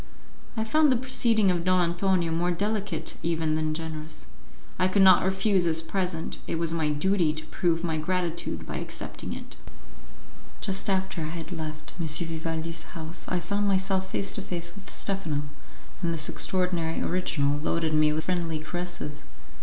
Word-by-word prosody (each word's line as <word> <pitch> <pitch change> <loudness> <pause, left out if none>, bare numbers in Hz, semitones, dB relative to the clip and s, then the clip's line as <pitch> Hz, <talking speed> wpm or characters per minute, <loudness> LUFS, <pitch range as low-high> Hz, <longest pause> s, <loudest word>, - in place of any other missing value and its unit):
I 220 - +2
found 300 +6 +4
the - - +4
proceeding 230 -5 +3
of 175 -1 0
Don 185 +1 +4
Antonio 175 -1 +2
more 170 +2 +1
delicate 200 -1 -1
even 160 -2 +1
than 155 0 0
generous; 155 -1 -6 0.5
I 185 - +5
could 195 +1 +4
not 190 -1 +8
refuse 190 0 +2
his 165 -1 +2
present; 180 -2 -2
it - - -1
was 165 0 +1
my 160 -2 +1
duty 165 +1 +2
to 155 0 -6
prove 165 -2 0
my 160 -2 0
gratitude 175 0 -1
by - - -4
accepting - - -5
it. - - -8 1.0
Just 195 +1 -1
after 190 -3 0
I - - -1
had 165 +2 -5
left 155 -3 -5
M. 165 - -1
Vivaldi's 165 +1 -1 0.2
house 160 +2 -3
I 180 - 0
found 200 +3 0
myself 190 -1 +1
face 195 - -1
to - - -2
face 170 -3 -2
with 200 +1 -11
Stephano, 170 -7 -2 0.6
and 170 -2 +1
this 160 -1 -2
extraordinary 180 -3 0
original 145 -5 +1
loaded 160 +1 0
me 155 0 +5
with 155 +1 -1
friendly 170 -3 0
caresses. 155 -2 -4
170 Hz, 165 wpm, -27 LUFS, 160-190 Hz, 1.0 s, not